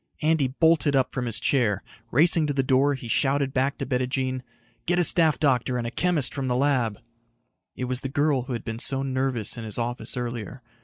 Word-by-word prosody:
Andy 155 -3 +3
bolted 155 +1 +2
up 130 -1 +2
from 125 -2 -3
his 115 -2 -1
chair. 110 -6 +1 0.3
Racing 155 +4 +3
to 145 - -1
the 135 -1 +1
door, 135 +2 +3
he 125 -3 -8
shouted 135 +2 +1
back 135 +2 0
to 135 - -3
Bettijean, 130 0 -1 0.5
"Get 175 +1 +2
a 175 - +4
staff 160 -2 +2
doctor 130 -4 +1
and 120 - -2
a 115 - -3
chemist 165 -5 0
from 135 -2 -3
the 125 - 0
lab." 125 -6 +1 0.8
It - - -5
was 125 0 -2
the 135 - -4
girl 145 -2 +1
who 130 - -4
had 115 - -4
been 115 0 -4
so 135 +2 0
nervous 130 -4 -1
in - - -6
his 110 -2 -5
office 120 +2 -3
earlier. 120 0 -5
130 Hz, 210 wpm, -25 LUFS, 125-145 Hz, 0.8 s, a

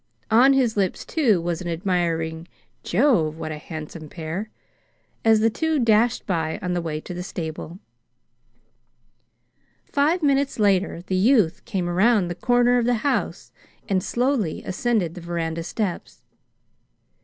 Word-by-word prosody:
On 250 +5 +6
his 255 -5 +2
lips, 195 -3 -1
too, 240 - +2
was 170 0 -3
an 175 - -5
admiring 165 -2 -1 0.3
"Jove! 175 - +2
what 160 -1 -5
a 150 - -6
handsome 155 0 -8
pair!" 170 +7 -5 0.7
as 220 -1 +4
the 225 - +4
two 320 +6 0
dashed 230 -1 +2
by 160 -4 -1
on 180 0 -3
the 175 - -1
way 155 -2 -3
to 180 - -8
the 175 - -5
stable. 165 -1 -6 2.1
Five 310 +5 +1
minutes 280 -1 +1
later 195 -4 +1
the 185 - -2
youth 200 -4 +3
came 190 -6 -2
around 190 +1 +3
the - - -2
corner 245 +6 +3
of 235 - 0
the 245 0 +2
house 285 - -1 0.4
and 190 -3 +1
slowly 245 - -1
ascended 190 -3 -1
the 180 - -9
veranda 165 -1 -3
steps. 180 +2 -4
185 Hz, 145 wpm, -23 LUFS, 170-235 Hz, 2.1 s, On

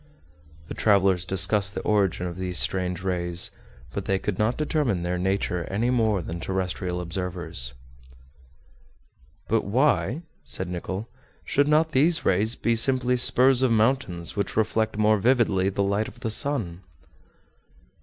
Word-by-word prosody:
The - - -6
travelers 95 -4 +2
discussed 95 +2 +2
the - - -3
origin 100 -4 +1
of 85 -1 -5
these 90 -1 -3
strange 90 -1 -1
rays; 85 -2 -1 0.4
but 100 - -4
they 95 - +1
could 95 0 -4
not 110 +3 +1
determine 145 - 0
their 90 +1 -2
nature 90 -2 -1
any 115 +6 -1
more 110 -7 +1
than 85 +2 -6
terrestrial 90 0 -3
observers. 85 -8 -3 1.7
"But - - +1
why," 130 - +1 0.2
said 95 - -2
Nicholl, 95 +4 -5 0.4
"should 145 +1 +1
not 155 +2 +3
these 160 +4 +3
rays 105 +6 +2
be 115 0 0
simply 125 +1 +2
spurs 125 +1 +4
of 130 - +3
mountains 110 -7 0
which 100 - -3
reflect 110 0 0
more 110 0 +3
vividly 105 -5 +2
the 100 +1 -1
light 100 +2 0
of 120 - -13
the 115 -3 -2
sun?" 110 - -2
100 Hz, 145 wpm, -25 LUFS, 90-120 Hz, 1.7 s, spurs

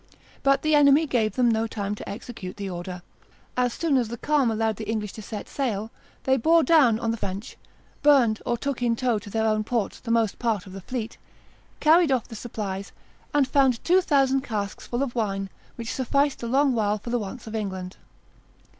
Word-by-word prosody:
But 275 0 +3
the 310 0 +2
enemy 290 +1 +6
gave 230 -7 0
them 250 -2 +3
no 225 -1 +2
time 205 -2 -3
to 210 - -7
execute 200 -3 -7
the 200 -1 -4
order. 175 0 -6 0.5
As 250 -1 +1
soon 315 -5 +1
as 245 -3 +1
the 235 +2 -6
calm 290 -1 +2
allowed 220 -1 0
the 220 -1 -6
English 215 -3 -2
to 220 - -8
set 210 +1 -7
sail, 225 -5 -2 0.3
they 265 0 +3
bore 325 +6 +4
down 285 -10 +5
on 230 -1 0
the 230 - -3
French, 200 +2 -5 0.5
burned 260 -7 +4
or 240 - -1
took 275 0 -3
in 235 -1 +2
tow 240 -2 0
to 205 0 -11
their 220 +2 0
own 215 -1 +1
ports 225 -2 -2
the 240 - -9
most 230 -2 +1
part 225 -6 0
of 190 - -11
the 195 - -7
fleet, 235 +2 -5 0.6
carried 320 0 +5
off 255 -4 +1
the 230 - -9
supplies, 200 -4 -5 0.4
and 285 -2 +3
found 265 -4 +2
two 365 +2 +4
thousand 270 -5 +2
casks 210 -6 -4
full 245 +3 -1
of 255 -4 -3
wine, 195 -4 -2 0.2
which 230 -1 -5
sufficed 280 +2 +1
a 235 - -3
long 270 +2 +3
while 210 -2 +1
for 235 +3 -7
the 245 - +1
wants 225 +4 -7
of 220 - -8
England." 190 -4 -4
230 Hz, 210 wpm, -25 LUFS, 210-265 Hz, 0.6 s, enemy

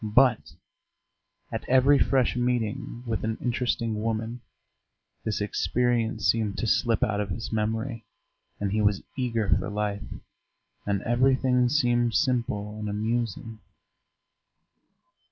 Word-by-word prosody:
But 110 - +3 1.0
at - - -3
every 130 +2 +5
fresh 130 -4 +2
meeting 120 -1 -2
with 115 -2 -2
an 110 0 -1
interesting 115 -3 -1
woman 115 +2 -2 0.8
this 110 - -1
experience 115 +1 0
seemed 110 -3 +1
to - - -1
slip 115 0 +2
out 105 -1 +1
of 100 - -3
his 110 +5 -4
memory, 110 +2 -2 0.6
and 100 -1 -1
he 110 +1 +1
was 105 -1 +2
eager 115 -5 -1
for 100 - +1
life, 105 0 -2 0.9
and 100 -1 0
everything 125 0 +3
seemed 120 -4 +2
simple 120 -6 0
and 105 -1 -3
amusing. 110 +1 -2
115 Hz, 120 wpm, -27 LUFS, 105-125 Hz, 1.0 s, every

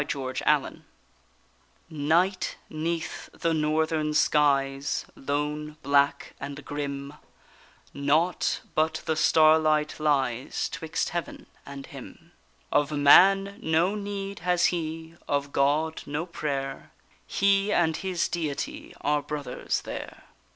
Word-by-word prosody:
THE - - -1 0.3
CAMPER - - +1 1.1
Night 165 +6 +1 0.2
'neath 165 +1 -3
the 165 - -1
northern 155 0 0
skies, 140 -2 +2
lone, 150 +2 -3
black, 140 0 +2
and 140 +1 -7
grim: 140 -1 -4 0.8
Naught 155 +5 +1
but 160 0 0
the 160 - 0
starlight 155 -1 +4
lies 135 -5 0
'twixt 160 +2 -3
heaven, 175 -1 -5 0.2
and 140 -1 -8
him. - - -12 0.4
Of 145 0 +2
man 195 +7 +6
no 165 +4 +2
need 200 -1 -5
has 180 0 +2
he, 165 0 -5
of 140 0 -1
God, 150 +4 +1
no 150 +4 -2
prayer; 140 -5 -4 0.4
He 200 +1 +2
and 160 -5 +2
his 185 -2 -1
Deity 280 - -4
are 150 0 +1
brothers 145 -3 -3
there. - - -7
155 Hz, 110 wpm, -27 LUFS, 145-170 Hz, 1.1 s, man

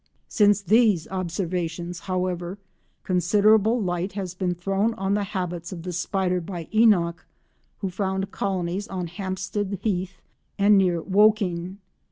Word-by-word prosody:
Since 205 -1 +3
these 210 -3 +3
observations, 175 -2 -3
however, 180 0 -3 0.5
considerable 210 +5 +3
light 180 -1 -2
has 190 -3 -4
been 180 -1 -2
thrown 195 +5 0
on 195 +1 -1
the 205 0 0
habits 175 -2 -4
of 170 -3 -7
the 180 0 -5
spider 180 +1 0
by 170 -1 -6
Enock, 185 -7 +4 0.6
who 195 -3 -2
found 190 +1 -2
colonies 190 0 -2
on 185 -2 -4
Hampstead 190 +2 -3
Heath 185 -3 -2 0.4
and 205 +1 +5
near 180 -4 +2
Woking. 195 -3 +2
185 Hz, 130 wpm, -24 LUFS, 175-200 Hz, 0.6 s, and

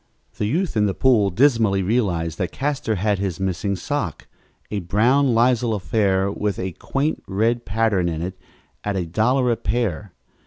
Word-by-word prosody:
The 105 - 0
youth 170 - -1
in 105 -1 +3
the 95 - -2
pool 115 -7 +3
dismally 110 -3 +3
realized 90 -7 0
that 90 -1 -1
Castor 135 -5 -1
had 100 +1 0
his 95 -4 -3
missing 95 +1 -1
sock, 100 - -3 0.5
a 105 - -1
brown 120 +8 +2
lisle 120 -1 +2
affair 100 -1 +1
with 105 0 -2
a 95 0 -3
quaint 140 - -2
red 115 +5 0
pattern 105 -4 +1
in 80 0 -3
it, 90 +1 -4 0.5
at 105 -1 -2
a 90 -2 -1
dollar 120 +8 +1
a - - +2
pair. 105 -6 -2
105 Hz, 165 wpm, -22 LUFS, 95-120 Hz, 0.5 s, in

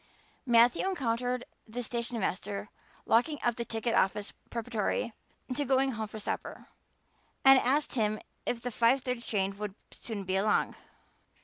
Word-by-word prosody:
Matthew 240 +9 +5
encountered 250 -6 -1 0.2
the 245 +3 -4
stationmaster 215 -4 -2 0.4
locking 295 +7 +3
up 240 -1 +2
the 235 - -2
ticket 225 +1 -1
office 200 +2 +1 0.2
preparatory 230 0 -1 0.4
to 290 +3 +1
going 270 0 +3
home 220 -2 -3
for 215 - -8
supper, 210 - -5 0.8
and 270 0 +9
asked 285 +4 +1
him 215 -3 +1 0.2
if 235 - -2
the 245 - -2
five 240 +4 +3
thirty 250 -2 -2
train 195 -4 0
would 210 -2 -4 0.2
soon 215 -4 -5
be 190 0 0
along. 210 +2 +2
235 Hz, 140 wpm, -30 LUFS, 215-250 Hz, 0.8 s, and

